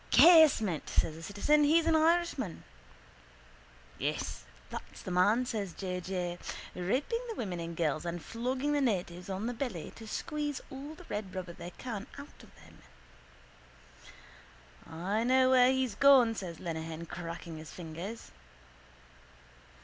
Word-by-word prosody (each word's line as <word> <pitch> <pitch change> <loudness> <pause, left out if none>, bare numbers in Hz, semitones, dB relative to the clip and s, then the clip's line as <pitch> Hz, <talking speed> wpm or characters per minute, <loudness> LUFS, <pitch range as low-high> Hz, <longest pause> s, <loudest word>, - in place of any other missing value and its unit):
—Casement, 305 - +6
says 155 - +1
the 160 - -10
citizen. 205 - +2
He's 320 +3 +4
an 330 -1 +4
Irishman. 320 - +1 1.4
—Yes, - - -3 0.3
that's - - -8
the 185 - -5
man, 205 +8 +3
says 205 -7 -3
J. 180 -2 -4
J. 175 -1 -3 0.3
Raping 255 - -1
the 450 - -4
women 185 - -3
and 170 0 -5
girls 155 -2 0
and 175 0 -3
flogging 255 - -2
the 290 - +2
natives 180 -7 -1
on 195 +3 -3
the 245 - -1
belly 230 - -4
to 225 - -10
squeeze 295 +2 -3
all 280 +3 -7
the 360 - -13
red 205 -2 -5
rubber 180 -2 -5
they 170 - -8
can 225 -3 -5
out 285 +1 -11
of - - -16
them. - - -18 2.1
—I 190 +7 -1
know 255 +1 +4
where 255 0 +6
he's 260 -4 0
gone, 255 -1 +6
says 180 -7 -6
Lenehan, 165 -1 -5
cracking 170 -1 -7
his 155 0 -10
fingers. 175 +6 -7
210 Hz, 140 wpm, -31 LUFS, 175-265 Hz, 2.1 s, Casement